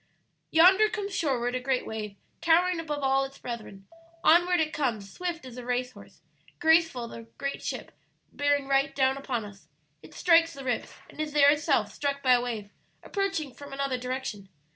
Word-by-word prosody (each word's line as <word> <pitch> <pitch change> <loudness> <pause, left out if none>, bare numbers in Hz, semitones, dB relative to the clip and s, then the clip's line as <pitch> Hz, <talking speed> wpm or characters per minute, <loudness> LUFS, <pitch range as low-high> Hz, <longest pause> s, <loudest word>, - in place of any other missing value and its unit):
"Yonder 380 +6 +6
comes 410 -3 -4
shoreward 245 -5 0
a 255 - -1
great 255 0 -1
wave, 215 -2 -5 0.3
towering 345 +1 +3
above 295 -3 -4
all 270 0 +3
its 270 0 -7
brethren. 215 -5 -8 0.4
Onward 350 +2 +5
it 310 -1 0
comes, 225 -9 -2
swift 345 -4 -4
as 250 -1 -10
a 250 - -6
race 250 +1 -1
horse, - - -16 0.4
graceful 320 -6 +3
as - - -8
a 230 0 -13
great 275 0 -4
ship, - - -5 0.4
bearing 285 -1 +1
right 275 0 +1
down 265 -1 +3
upon 255 -5 -3
us. 200 -1 -13 0.3
It - - -15
strikes 335 -1 +4
'The 275 -1 -9
Rips,' 250 - -2
and - - -16
is 305 -1 -3
there 285 -1 +7
itself 285 -9 +1
struck 280 +2 -2
by 255 -1 +5
a 245 - +4
wave 220 -4 -5 0.3
approaching 390 - -2
from 285 +1 -11
another 275 -2 -2
direction. 250 -6 -5
275 Hz, 185 wpm, -28 LUFS, 245-320 Hz, 0.4 s, there